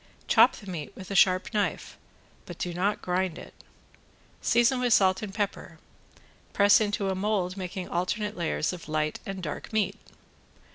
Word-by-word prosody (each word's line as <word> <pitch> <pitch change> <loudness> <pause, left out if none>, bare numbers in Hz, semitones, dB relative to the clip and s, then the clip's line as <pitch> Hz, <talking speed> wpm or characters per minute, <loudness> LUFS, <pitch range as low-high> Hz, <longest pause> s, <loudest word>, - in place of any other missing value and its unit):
Chop - - +6
the 205 - -12
meat 165 -6 -5
with 190 0 -10
a - - -2
sharp 185 +2 +3
knife, 205 -2 -2 0.5
but 175 - -8
do 175 - -3
not 195 +4 -1
grind 180 -1 -1
it, - - -11 0.9
season 240 +2 +3
with 245 -2 +2
salt 185 -2 +4
and 210 -3 -5
pepper. 200 -4 -4 0.8
Press 205 +1 +5
into 205 -2 0
a - - 0
mold 190 -2 -1
making 185 -1 -5
alternate 205 +4 -2
layers 170 0 -1
of 175 -3 -9
light 155 0 -1
and 195 -2 -5
dark 150 - -6
meat. 215 -1 0
190 Hz, 160 wpm, -27 LUFS, 180-205 Hz, 0.9 s, Chop